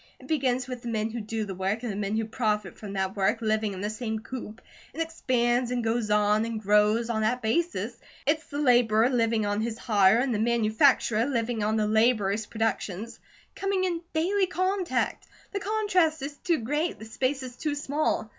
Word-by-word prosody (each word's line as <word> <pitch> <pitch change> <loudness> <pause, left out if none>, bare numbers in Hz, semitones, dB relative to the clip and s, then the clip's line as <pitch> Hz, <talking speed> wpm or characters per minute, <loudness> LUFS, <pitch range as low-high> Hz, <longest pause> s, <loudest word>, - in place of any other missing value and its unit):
It - - -14
begins 260 -5 0
with 250 -2 -6
the 240 - -8
men 220 -1 -1
who 235 0 -4
do 220 +1 -3
the 195 - -5
work, 195 +5 -2
and 240 - -2
the - - -5
men 205 +1 -1
who 225 - 0
profit 215 -3 -1
from 205 -2 -8
that 190 0 -2
work, 200 +3 +1
living 215 -2 0
in 185 - -6
the 205 - -1
same 220 0 -3
coop. 225 -1 -7 0.4
It - - -7
expands, 250 -7 +1
and 245 -1 -1
goes 225 -1 0
on, 210 +1 +3
and 230 -1 -3
grows, 210 +3 +3
on 220 -1 -1
that 245 +3 0
basis. 340 +11 0 0.3
It's 310 +2 +1
the 285 - -6
laborer, 240 -4 +4
living 230 -3 +1
on 205 +1 0
his 225 0 -3
hire, 205 -4 +4
and 250 +1 +1
the 210 - -1
manufacturer 230 0 +3
living 235 -4 -1
on 215 +1 +1
the 215 -1 +1
laborer's 220 -1 +2
productions, 225 -1 -3 0.4
coming 390 -1 0
in 345 -3 -1
daily 375 +5 +1
contact. 370 +1 -1 0.2
The 400 - -2
contrast 370 -7 +1
is 285 +1 -5
too 340 +1 +1
great, 295 +8 -1
the 220 - -10
space 260 +4 -1
is 250 -1 -8
too 295 +2 -2
small. 290 -4 -1
230 Hz, 200 wpm, -27 LUFS, 215-275 Hz, 0.4 s, laborer